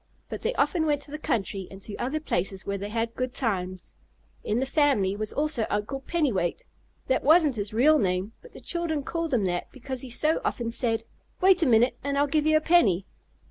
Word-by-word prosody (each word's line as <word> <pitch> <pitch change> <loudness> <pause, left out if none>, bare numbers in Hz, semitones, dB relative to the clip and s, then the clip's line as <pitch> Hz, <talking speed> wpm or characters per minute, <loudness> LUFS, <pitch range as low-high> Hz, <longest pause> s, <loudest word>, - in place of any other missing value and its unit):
But - - -6
they - - -1
often 325 -4 +1
went 290 -1 0
to 285 - -11
the 300 - -5
country 195 -7 -2
and 195 - -11
to 205 - -6
other 270 +6 -2
places 190 - -2
where 200 0 -2
they 200 +1 -5
had 230 +1 -2
good 255 0 -3
times. 185 -6 -3 0.5
In 215 +3 0
the 265 - 0
family 270 -9 +2
was 215 0 -2
also 295 -6 -1
Uncle 210 +6 -2
Pennywait. 260 - -1 0.4
That 260 - +1
wasn't 310 -3 +5
his 205 0 -3
real 290 +8 +4
name, 185 +1 -1
but 485 - -16
the - - -11
children 335 -4 -1
called 330 +1 -3
him 240 -6 +2
that 175 -1 -2
because 260 0 -6
he 260 - -8
so 305 +7 +1
often 235 -1 -2
said: 230 -1 -1 0.4
"Wait 375 -1 +5
a 320 - +3
minute 240 +1 +3
and 280 0 -1
I'll 285 - +4
give 300 +1 +1
you 310 0 +5
a - - 0
penny." 215 - +3
255 Hz, 215 wpm, -26 LUFS, 205-305 Hz, 0.5 s, wasn't